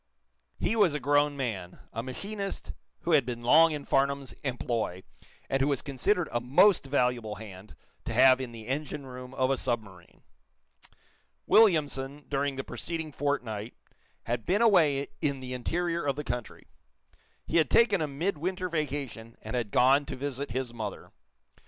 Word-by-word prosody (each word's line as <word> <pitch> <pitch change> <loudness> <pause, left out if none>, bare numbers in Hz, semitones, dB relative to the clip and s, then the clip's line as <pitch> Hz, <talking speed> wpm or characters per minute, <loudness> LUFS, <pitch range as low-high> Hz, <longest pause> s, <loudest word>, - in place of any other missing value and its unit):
He - - 0
was 195 -9 +3
a - - -1
grown 145 +1 +2
man, 100 -9 -4 0.2
a 115 - -2
machinist 195 - -5 0.3
who 170 - -2
had 150 -4 +5
been 120 -1 -5
long 160 +7 +6
in 150 -2 -4
Farnum's 140 0 0
employ, 120 -8 -2 0.4
and 135 0 0
who 135 - +3
was 140 -3 0
considered 160 +6 0
a 120 - -1
most 140 - +4
valuable 125 -5 0
hand 100 -1 -11 0.3
to - - -3
have 130 +2 +6
in 125 -2 -5
the 115 -2 -10
engine 140 +1 -3
room 125 -1 -9
of 130 0 +1
a 135 - +1
submarine. 100 -9 -4 1.2
Williamson, 145 -9 +3
during 140 0 0
the 135 - -4
preceding 160 +1 -4
fortnight, 125 -7 -3 0.5
had 120 0 -2
been 205 +6 +3
away 155 -10 +4 0.2
in 140 -2 0
the 130 -1 -6
interior 170 +7 -1
of 140 -2 0
the 150 - -4
country. 120 -3 -5 0.8
He 165 - 0
had 155 -5 +3
taken 210 -6 +4
a 155 - 0
midwinter 180 +4 -2
vacation, 140 -8 -4
and - - -5
had 120 -4 -1
gone 135 +6 +4
to - - -4
visit 140 +1 -4
his 125 0 -3
mother. 110 -4 -6
135 Hz, 160 wpm, -29 LUFS, 120-150 Hz, 1.2 s, long